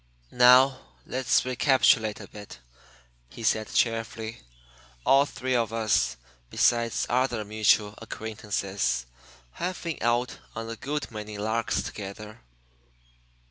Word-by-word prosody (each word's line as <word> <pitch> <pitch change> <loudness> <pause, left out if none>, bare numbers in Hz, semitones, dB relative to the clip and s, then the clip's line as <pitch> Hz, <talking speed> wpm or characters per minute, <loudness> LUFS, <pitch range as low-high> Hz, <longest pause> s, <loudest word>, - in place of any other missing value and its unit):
"Now, 130 +2 +6 0.3
let's 130 0 +1
recapitulate 125 -4 +3
a - - -9
bit," 105 - -11 0.7
he 115 - -10
said 110 0 +1
cheerfully. 115 - -1 0.6
"All 140 +1 +5
three 130 -2 -2
of 115 -3 +1
us, 110 - +1 0.3
besides 115 - +2
other 120 -3 0
mutual 105 0 +2
acquaintances, 100 - -3 0.5
have 180 +1 -4
been 165 -3 -4
out 120 +1 0 0.2
on 115 0 -5
a - - -5
good 145 +4 -4
many 105 -1 -7
larks 110 +3 -1
together." 105 - -8
115 Hz, 110 wpm, -27 LUFS, 105-125 Hz, 0.7 s, Now